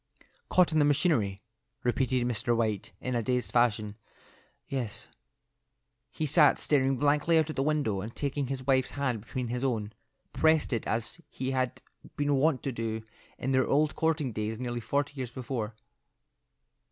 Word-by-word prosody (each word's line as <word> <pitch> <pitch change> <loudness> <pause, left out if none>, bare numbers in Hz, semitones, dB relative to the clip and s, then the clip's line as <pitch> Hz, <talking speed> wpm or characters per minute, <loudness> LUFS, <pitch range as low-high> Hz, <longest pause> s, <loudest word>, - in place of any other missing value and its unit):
"Caught 180 -2 +4
in 155 - +3
the - - +5
machinery," 130 - +1 0.4
repeated 125 0 +1
Mr. 120 0 0
White, 110 -4 -1
in 125 - -3
a 120 - +1
dazed 125 +2 -1
fashion, 110 -3 +1 0.7
"yes." 125 -6 -4 1.0
He 155 - -3
sat 150 0 +5
staring 135 -2 +2
blankly 150 +4 +3
out 160 -1 +2
at - - -8
the - - 0
window, 140 -9 0
and 110 +4 -7
taking 140 -1 -1
his 130 -1 -4
wife's 130 -1 +3
hand 130 -6 0
between 120 +2 -4
his 125 +2 -2
own, 110 -5 -1 0.4
pressed 160 -3 +3
it 115 - -2
as 115 +9 -3
he 130 0 -3
had 130 -2 -1 0.3
been 145 0 +1
wont 140 -1 +2
to 135 - -1
do 110 -2 -3 0.3
in 130 - -2
their 130 -1 +3
old 150 +1 +2
courting 160 -5 0
days 110 +1 -3
nearly 120 -1 -3
forty 140 +6 -1
years 130 -3 -4
before. 120 -4 -4
130 Hz, 165 wpm, -29 LUFS, 115-145 Hz, 1.0 s, the